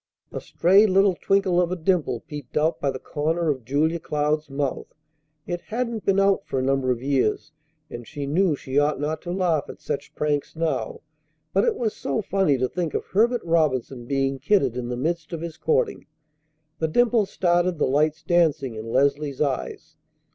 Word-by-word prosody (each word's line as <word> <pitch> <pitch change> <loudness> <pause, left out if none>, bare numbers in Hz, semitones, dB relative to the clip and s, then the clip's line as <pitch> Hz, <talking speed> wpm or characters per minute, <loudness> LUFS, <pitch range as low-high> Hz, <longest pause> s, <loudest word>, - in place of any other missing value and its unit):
A - - -5
stray 195 +5 +4
little 195 0 +4
twinkle 190 -1 +2
of 175 0 0
a - - 0
dimple 165 -8 0
peeped 145 -4 -8
out 155 +2 +1
by 140 - +1
the 130 - -3
corner 155 +4 -1
of 130 -4 -5
Julia 155 +7 0
Cloud's 150 0 -1
mouth. 135 -1 -3 0.5
It 175 -1 -4
hadn't 230 -1 -3
been 195 0 +3
out 195 0 +3
for - - -2
a 130 - 0
number 135 -1 +1
of 125 -1 -1
years, 135 +1 0 0.4
and 120 -4 -9
she 145 -2 -5
knew 165 +3 +2
she 135 0 -1
ought 145 -1 +1
not 150 +2 -2
to 175 - -5
laugh 175 -5 +1
at - - -9
such 140 - -5
pranks 150 0 -1
now; 165 - -2 0.5
but - - +3
it 465 -2 +1
was 225 - -2
so - - -2
funny 190 -8 +2
to 130 0 0
think 170 +2 -3
of - - -2
Herbert 235 +4 +1
Robinson 135 -7 0
being 135 0 0
kidded 140 - +2
in 125 -1 -4
the 125 - -3
midst 165 +5 -2
of 165 - -4
his 165 -1 -6
courting! 470 -1 0 0.7
The 160 - +1
dimple 230 +4 +2
started 175 -1 +1
the - - +2
lights 155 +3 +1
dancing 155 -7 +2
in 110 +1 -7
Leslie's 140 +1 +1
eyes. 150 +2 -3
155 Hz, 190 wpm, -24 LUFS, 140-180 Hz, 0.7 s, stray